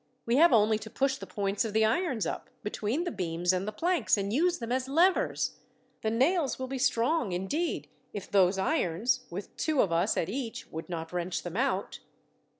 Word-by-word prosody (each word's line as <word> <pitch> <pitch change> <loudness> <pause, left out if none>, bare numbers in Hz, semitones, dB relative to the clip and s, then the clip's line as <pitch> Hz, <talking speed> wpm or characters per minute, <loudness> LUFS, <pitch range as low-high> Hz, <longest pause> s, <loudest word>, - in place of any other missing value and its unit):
We 235 +2 +2
have 335 +2 +7
only 215 -2 +4
to 220 +1 -9
push 275 +2 0
the - - -9
points 200 0 -1
of 220 -3 -4
the 220 0 +4
irons 255 - 0
up, - - -4
between 215 +8 -1
the 350 - -3
beams 175 - 0
and 185 +2 -1
the - - -1
planks, 340 +4 +1
and 200 +1 -2
use 345 +6 +2
them 235 -1 -5
as 255 +1 0
levers. 345 +6 +2 0.4
The 220 - 0
nails 275 +6 +2
will 260 - -3
be 265 0 -4
strong, 245 - +1
indeed, 240 - -2 0.2
if 205 - -6
those 190 -1 +4
irons, 230 - 0
with 185 +3 -7
two 310 -3 0
of 190 - +3
us 170 +5 +1
at 160 - 0
each, 235 +1 -4
would 160 +3 -6
not 165 -1 -5
wrench 180 0 -2
them 175 0 -6
out." 260 +5 -1
220 Hz, 200 wpm, -29 LUFS, 190-275 Hz, 0.4 s, have